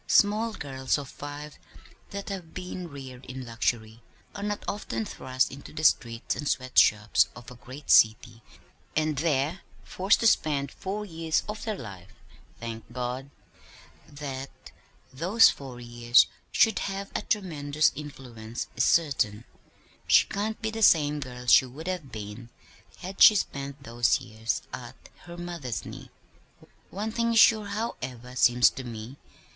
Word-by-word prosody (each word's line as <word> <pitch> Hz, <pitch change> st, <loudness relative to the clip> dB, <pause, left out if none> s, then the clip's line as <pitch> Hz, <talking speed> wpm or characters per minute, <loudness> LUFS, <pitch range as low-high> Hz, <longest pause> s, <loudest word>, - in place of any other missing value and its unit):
Small 215 Hz, +2 st, +3 dB
girls 135 Hz, -6 st, -2 dB
of 140 Hz, -2 st, -7 dB
five 145 Hz, +1 st, -8 dB, 0.5 s
that 200 Hz, +1 st, -6 dB
have 185 Hz, -5 st, -7 dB
been 180 Hz, -1 st, -6 dB
reared 135 Hz, -3 st, -10 dB
in 130 Hz, 0 st, -7 dB
luxury 115 Hz, -1 st, -2 dB, 0.3 s
are 200 Hz, -, -7 dB
not 205 Hz, 0 st, -3 dB
often 115 Hz, -, -3 dB
thrust 130 Hz, +3 st, -1 dB
into 140 Hz, +1 st, -10 dB
the 155 Hz, -, -6 dB
streets 115 Hz, -6 st, +2 dB
and 150 Hz, -, -4 dB
sweat 130 Hz, -2 st, +2 dB
shops 105 Hz, -3 st, +4 dB
of 120 Hz, 0 st, -11 dB
a -, -, -10 dB
great 130 Hz, +4 st, -7 dB
city 110 Hz, +1 st, +4 dB, 0.5 s
and 155 Hz, -2 st, +1 dB
there 155 Hz, +2 st, 0 dB, 0.2 s
forced 190 Hz, +3 st, +2 dB
to -, -, 0 dB
spend 145 Hz, -, +2 dB
four 205 Hz, +2 st, -5 dB
years 165 Hz, -3 st, -1 dB
of 210 Hz, 0 st, -5 dB
their 215 Hz, -3 st, -2 dB
life 95 Hz, -, -10 dB, 0.5 s
thank 115 Hz, 0 st, -7 dB
God! 125 Hz, +2 st, -4 dB, 0.8 s
That 135 Hz, -2 st, -8 dB, 0.4 s
those 185 Hz, -, +5 dB
four 130 Hz, -3 st, -9 dB
years 120 Hz, 0 st, +4 dB, 0.3 s
should 220 Hz, -2 st, +4 dB
have 195 Hz, 0 st, -4 dB
had -, -, -3 dB
a -, -, -26 dB
tremendous 155 Hz, -7 st, +1 dB
influence 120 Hz, -6 st, -7 dB
is -, -, +2 dB
certain. 130 Hz, -10 st, +2 dB, 0.6 s
She -, -, +6 dB
can't 215 Hz, +2 st, -3 dB
be 220 Hz, -, 0 dB
the 225 Hz, 0 st, -5 dB
same 150 Hz, -6 st, +5 dB
girl 125 Hz, -3 st, -7 dB
she 130 Hz, +1 st, +6 dB
would 145 Hz, +6 st, -10 dB
have 175 Hz, -8 st, -4 dB
been 110 Hz, +2 st, -8 dB, 0.5 s
had 190 Hz, +2 st, -7 dB
she 215 Hz, -, +10 dB
spent 140 Hz, -6 st, -3 dB
those 115 Hz, -3 st, +2 dB
years 110 Hz, +2 st, -3 dB
at 125 Hz, 0 st, -8 dB, 0.3 s
her 175 Hz, 0 st, -9 dB
mother's 170 Hz, -9 st, -5 dB
knee. -, -, -9 dB, 0.8 s
One 210 Hz, +3 st, -4 dB
thing 230 Hz, +1 st, 0 dB
is 225 Hz, -, +5 dB
sure, 215 Hz, -2 st, +6 dB
however, 130 Hz, -, -5 dB
seems 125 Hz, -1 st, +5 dB
to 130 Hz, -, -7 dB
me. 120 Hz, +2 st, -8 dB
140 Hz, 150 wpm, -27 LUFS, 120-180 Hz, 0.8 s, she